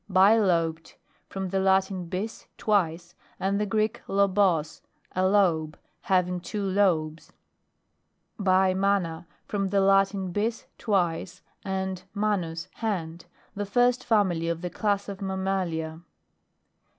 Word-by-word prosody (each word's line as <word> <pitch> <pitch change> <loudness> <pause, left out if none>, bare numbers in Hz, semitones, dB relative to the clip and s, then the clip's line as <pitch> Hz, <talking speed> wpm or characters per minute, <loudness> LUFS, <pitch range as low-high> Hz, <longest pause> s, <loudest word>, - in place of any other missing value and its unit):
BILOBED 185 -5 +3 0.3
From 190 -1 -4
the 195 +1 0
Latin, 190 -1 +2
bis, 200 +6 -5
twice, 175 -5 0 0.3
and 200 +2 0
the 210 - 0
Greek 215 +2 0
lobos, 190 -6 +2 0.3
a 185 - 0
lobe. 175 -6 +2 0.2
Having 180 -1 +1
two 205 +3 -4
lobes. 175 -5 0 1.1
BIMANA. 185 -3 +1 0.2
From 195 -2 -2
the 200 +1 +2
Latin, 195 -1 +2
bis, 220 +5 -2
twice, 180 -4 -1 0.2
and 190 -1 -3
manus, 185 -5 -1
hand. 170 -7 -3 0.3
The 205 -1 -4
first 245 +4 +2
family 190 -7 +1
of 170 0 -2
the 180 -1 -4
class 205 -2 -1
of 200 0 -7
mammalia. 190 -4 -2
190 Hz, 115 wpm, -26 LUFS, 175-200 Hz, 1.1 s, BILOBED